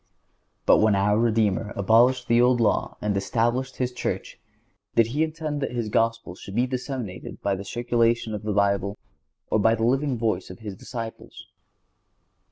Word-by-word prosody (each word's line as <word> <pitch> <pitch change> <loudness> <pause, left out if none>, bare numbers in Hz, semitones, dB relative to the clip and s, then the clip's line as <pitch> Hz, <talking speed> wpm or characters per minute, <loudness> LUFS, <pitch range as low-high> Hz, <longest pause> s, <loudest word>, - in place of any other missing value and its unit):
But - - +6
when 110 -1 +4
our 105 +2 +2
Redeemer 110 -3 +1
abolished 120 +5 +3
the 120 +1 +4
Old 125 0 +4
Law 115 - +1
and 105 -1 0
established 120 +6 0
His 125 -1 -1
Church, 125 - -4 0.6
did 115 - +5
He 150 - 0
intend 155 -2 -3
that 135 - -2
His 120 -3 -2
Gospel 115 -3 0
should 95 +2 -10
be 120 +2 +3
disseminated 125 -6 -5
by 100 - +1
the 95 +1 -4
circulation 115 +1 0
of 105 - -4
the 105 - -3
Bible, 100 0 +1 0.5
or 110 - +3
by 115 +2 +4
the 115 0 0
living 135 +1 +1
voice 110 -5 -1
of 90 - -9
His 105 -3 -7
disciples? 115 +2 -8
115 Hz, 170 wpm, -25 LUFS, 105-125 Hz, 0.6 s, But